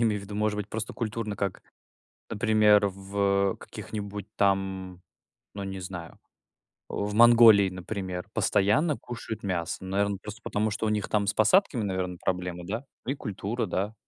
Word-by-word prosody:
не -, -, +2 dB
имею 105 Hz, -3 st, +2 dB
в 100 Hz, -, -10 dB
виду 100 Hz, +1 st, -8 dB
может 105 Hz, 0 st, 0 dB
быть 105 Hz, 0 st, -4 dB
просто 110 Hz, +1 st, -4 dB
культурно 110 Hz, -2 st, -3 dB
как 100 Hz, -2 st, -3 dB, 0.7 s
например, 105 Hz, -2 st, +4 dB
в, 100 Hz, 0 st, 0 dB
э, -, -, -11 dB
каких-нибудь 105 Hz, -1 st, -7 dB
там, 95 Hz, -2 st, 0 dB, 0.5 s
ну, 100 Hz, -, -5 dB
не 95 Hz, -1 st, -5 dB
знаю, 90 Hz, -2 st, -8 dB, 0.7 s
а, -, -, -9 dB
в 105 Hz, 0 st, -2 dB
Монголии, 115 Hz, -3 st, +7 dB
например, 95 Hz, -1 st, -5 dB
постоянно 115 Hz, -, +2 dB
кушают 115 Hz, -3 st, -7 dB
мясо. 90 Hz, -2 st, -2 dB
Ну 95 Hz, -, -7 dB
наверно, 100 Hz, +1 st, 0 dB
просто 105 Hz, +4 st, -9 dB
потому, 105 Hz, +1 st, -1 dB
что 110 Hz, +1 st, -2 dB
у -, -, +1 dB
них 105 Hz, -1 st, -1 dB
там 105 Hz, -1 st, +1 dB
с 100 Hz, -, +1 dB
посадками, 120 Hz, -, +3 dB
наверно, 95 Hz, -2 st, -2 dB
проблемы 90 Hz, -1 st, -2 dB
да. 110 Hz, +8 st, -4 dB, 0.2 s
И 135 Hz, -, 0 dB
культура, 110 Hz, 0 st, -3 dB
да. 100 Hz, +4 st, -2 dB
100 Hz, 170 wpm, -27 LUFS, 95-110 Hz, 0.7 s, Монголии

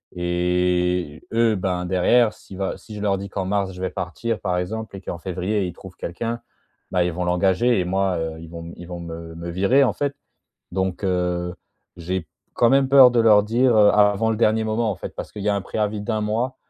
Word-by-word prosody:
et 90 Hz, -2 st, 0 dB
eux, 115 Hz, -1 st, +3 dB
ben, 90 Hz, -2 st, -2 dB
derrière, 105 Hz, +6 st, +3 dB
si 95 Hz, -, -13 dB
bah 95 Hz, 0 st, -2 dB
si 110 Hz, -, -11 dB
je 105 Hz, -, -6 dB
leur 100 Hz, -2 st, +1 dB
dis 100 Hz, +1 st, -6 dB
qu'en 95 Hz, -1 st, -3 dB
mars, 100 Hz, 0 st, -1 dB
je 90 Hz, -, -9 dB
vais 95 Hz, -, -1 dB
partir, 100 Hz, +5 st, -3 dB
par 90 Hz, -1 st, -1 dB
exemple, 110 Hz, +4 st, -5 dB
et 95 Hz, -, -8 dB
qu'en 90 Hz, -, -5 dB
février, 95 Hz, +3 st, -2 dB
ils 90 Hz, -, -5 dB
trouvent 95 Hz, +1 st, -12 dB
quelqu'un, 115 Hz, +7 st, -4 dB, 0.5 s
bah, 90 Hz, -1 st, +2 dB
ils 90 Hz, -, 0 dB
vont 90 Hz, +2 st, -3 dB
l'engager. 95 Hz, +6 st, +2 dB
Et 90 Hz, -, 0 dB
moi, 95 Hz, 0 st, 0 dB
heu, 80 Hz, -1 st, -4 dB
ils 80 Hz, 0 st, -10 dB
vont 85 Hz, 0 st, -8 dB
ils 85 Hz, -, -10 dB
vont 90 Hz, 0 st, -6 dB
m 85 Hz, -, -7 dB
me 80 Hz, 0 st, -8 dB
me 85 Hz, +1 st, -6 dB
virer, 100 Hz, +11 st, +3 dB
en 130 Hz, -, +2 dB
fait. 145 Hz, -1 st, -2 dB, 0.6 s
Donc, 95 Hz, 0 st, -2 dB
heu, 90 Hz, -1 st, -1 dB, 0.4 s
j'ai 90 Hz, +1 st, -3 dB, 0.3 s
quand 120 Hz, -, +4 dB
même 135 Hz, 0 st, +4 dB
peur 135 Hz, -2 st, +9 dB
de 120 Hz, -, +2 dB
leur 105 Hz, -3 st, +6 dB
dire, 120 Hz, +3 st, +2 dB
heu, 105 Hz, -1 st, +7 dB
av -, -, +2 dB, 0.2 s
avant 110 Hz, +3 st, 0 dB
le -, -, 0 dB
dernier 110 Hz, 0 st, +2 dB
moment, 110 Hz, +1 st, 0 dB
en -, -, -4 dB
fait, -, -, -8 dB
parce -, -, -7 dB
qu'il 105 Hz, -, -7 dB
y 105 Hz, -, +1 dB
a 100 Hz, -, +2 dB
un 100 Hz, -, -1 dB
préavis 105 Hz, +1 st, -2 dB
d'1 110 Hz, +1 st, -2 dB
mois. 115 Hz, +5 st, -1 dB
95 Hz, 235 wpm, -22 LUFS, 90-110 Hz, 0.6 s, peur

